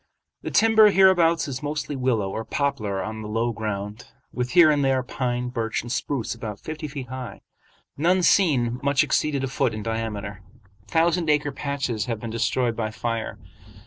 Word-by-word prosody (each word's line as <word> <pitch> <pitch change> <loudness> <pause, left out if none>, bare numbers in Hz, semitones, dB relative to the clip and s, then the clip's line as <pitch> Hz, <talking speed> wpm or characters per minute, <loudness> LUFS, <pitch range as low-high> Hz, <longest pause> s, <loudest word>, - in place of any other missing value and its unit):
The - - -4
timber 220 -1 +6
hereabouts 175 -5 +4
is 135 -2 -5
mostly 150 -1 -3
willow 120 -7 0
or 110 - -4
poplar 110 -9 -2
on 110 0 -5
the 105 - -6
low 115 +2 0
ground, 105 0 -5 0.3
with 125 0 -3
here 170 -3 +7
and 145 -1 +1
there 135 -1 +2
pine, 125 -1 -2
birch, 115 -2 -2
and 120 - -7
spruce 125 -1 -2
about 110 -3 -7
fifty 155 0 -6
feet 135 -4 -7
high. 130 -1 -7 0.6
None 180 +5 +2
seen 125 -12 +3
much 140 -1 +3
exceeded 145 -3 0
a - - 0
foot 130 -3 0
in 110 - -5
diameter. 105 -3 -4 0.5
Thousand 165 - +2
acre 150 -1 +2
patches 140 -6 -2
have 115 -3 -3
been 115 0 -6
destroyed 115 +1 0
by 110 -2 -2
fire. 115 0 -4
125 Hz, 175 wpm, -24 LUFS, 115-150 Hz, 0.6 s, here